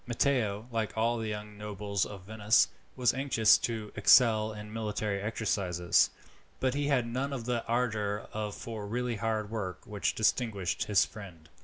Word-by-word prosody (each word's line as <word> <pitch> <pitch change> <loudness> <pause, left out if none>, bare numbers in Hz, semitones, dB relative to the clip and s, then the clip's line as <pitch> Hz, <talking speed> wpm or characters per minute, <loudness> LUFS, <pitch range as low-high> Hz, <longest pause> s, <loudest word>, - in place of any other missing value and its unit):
Matteo, 115 -4 0
like 110 -2 -2
all 115 +1 +1
the 110 - -3
young 105 -1 -6
nobles 105 -2 -2
of 100 -3 -10
Venice, 110 +2 +3 0.3
was 125 -3 +2
anxious 130 -5 +4
to 110 -3 -3
excel 110 -3 +5
in 105 0 -9
military 105 -2 -2
exercises, 100 -5 +1 0.5
but 130 -1 +1
he 145 +1 -1
had 135 -4 +2
none 130 +4 -2
of 125 -5 -4
the 120 -1 -1
ardour 110 -4 -1 0.2
for 110 -1 -6
really 120 +1 -2
hard 110 -1 -2
work 95 -5 -4
which 105 -2 -2
distinguished 105 -5 0
his 105 -2 +4
friend. 85 -7 -12
110 Hz, 155 wpm, -30 LUFS, 105-115 Hz, 0.5 s, excel